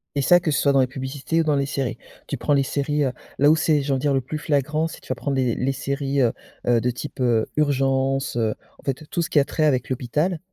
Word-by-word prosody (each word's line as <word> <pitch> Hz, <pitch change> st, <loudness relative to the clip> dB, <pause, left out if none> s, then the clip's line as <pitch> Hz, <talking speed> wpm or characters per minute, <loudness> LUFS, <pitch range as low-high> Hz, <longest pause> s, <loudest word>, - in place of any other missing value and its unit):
Et 140 Hz, -, +1 dB
ça, 175 Hz, +7 st, +6 dB
que 165 Hz, -3 st, -1 dB
ce 145 Hz, -, +1 dB
soit 140 Hz, -, +3 dB
dans 135 Hz, -, +4 dB
les -, -, +4 dB
publicités 135 Hz, +5 st, -2 dB
ou -, -, +1 dB
dans 150 Hz, -2 st, +2 dB
les 140 Hz, 0 st, +1 dB
séries. 135 Hz, -4 st, -2 dB, 0.3 s
Tu 140 Hz, -, -3 dB
prends 145 Hz, -, +1 dB
les 140 Hz, -, +4 dB
séries, 145 Hz, +2 st, 0 dB
heu, 130 Hz, -, +1 dB, 0.3 s
là 145 Hz, +2 st, +6 dB
où 155 Hz, -, +6 dB
c'est, 155 Hz, -2 st, +2 dB
j'ai 140 Hz, +1 st, -2 dB
envie 130 Hz, -, -1 dB
dire, 145 Hz, -1 st, +2 dB
le 135 Hz, -, +2 dB
plus 140 Hz, +5 st, -5 dB
flagrant 150 Hz, +1 st, 0 dB
c'est -, -, -10 dB
tu -, -, -17 dB
vas 130 Hz, -, -1 dB
prendre 140 Hz, +2 st, -2 dB
les 125 Hz, -3 st, +1 dB
les 130 Hz, +2 st, 0 dB
séries, 140 Hz, +1 st, -1 dB
heu, 120 Hz, -3 st, +3 dB, 0.4 s
heu, 120 Hz, -1 st, +4 dB
de 125 Hz, +2 st, 0 dB
type 140 Hz, +3 st, -8 dB
heu, 120 Hz, -3 st, +2 dB
Urgences, 135 Hz, -2 st, +1 dB
heu, 110 Hz, -2 st, +1 dB, 0.2 s
en -, -, -20 dB
fait 145 Hz, +3 st, -4 dB
tout 170 Hz, -, -1 dB
ce -, -, -4 dB
qui 150 Hz, -, +4 dB
a 140 Hz, -, +3 dB
trait 155 Hz, -, 0 dB
avec 130 Hz, -4 st, +1 dB
l'hôpital 150 Hz, +8 st, -1 dB
140 Hz, 280 wpm, -23 LUFS, 130-150 Hz, 0.4 s, ça